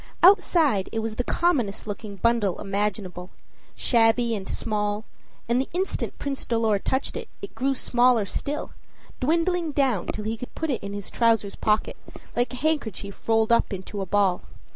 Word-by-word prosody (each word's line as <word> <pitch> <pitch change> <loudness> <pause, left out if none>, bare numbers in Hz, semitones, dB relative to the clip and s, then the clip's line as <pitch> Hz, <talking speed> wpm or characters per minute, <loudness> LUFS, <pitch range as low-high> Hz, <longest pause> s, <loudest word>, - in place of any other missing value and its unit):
Outside 335 - +5
it 225 - -4
was 220 -1 -3
the 245 - 0
commonest 255 - 0
looking 205 -1 -6
bundle 225 -3 +1
imaginable 195 -3 -3 0.5
shabby 230 0 +3
and 195 -2 -6
small; 210 0 -1 0.4
and 240 +2 +2
the 265 - -5
instant 375 +2 -2
Prince 275 -1 -4
Dolor 225 -3 +1
touched 260 +6 -1
it, - - -6
it 400 - -7
grew 270 +1 0
smaller 245 -3 +3
still, 290 +9 -3 0.5
dwindling 335 +3 +1
down 260 -10 +1
till 210 - -4
he 225 +1 -2
could 250 - -8
put 320 -2 -1
it 245 - -2
in 200 0 -6
his 205 -1 -6
trousers 225 -4 +2
pocket, 215 0 0 0.4
like 245 +1 +1
a - - -5
handkerchief 245 - -2
rolled 225 0 +3
up 235 - +3
into 195 +1 -5
a 190 - -3
ball. 195 -2 +2
225 Hz, 165 wpm, -25 LUFS, 205-265 Hz, 0.5 s, Outside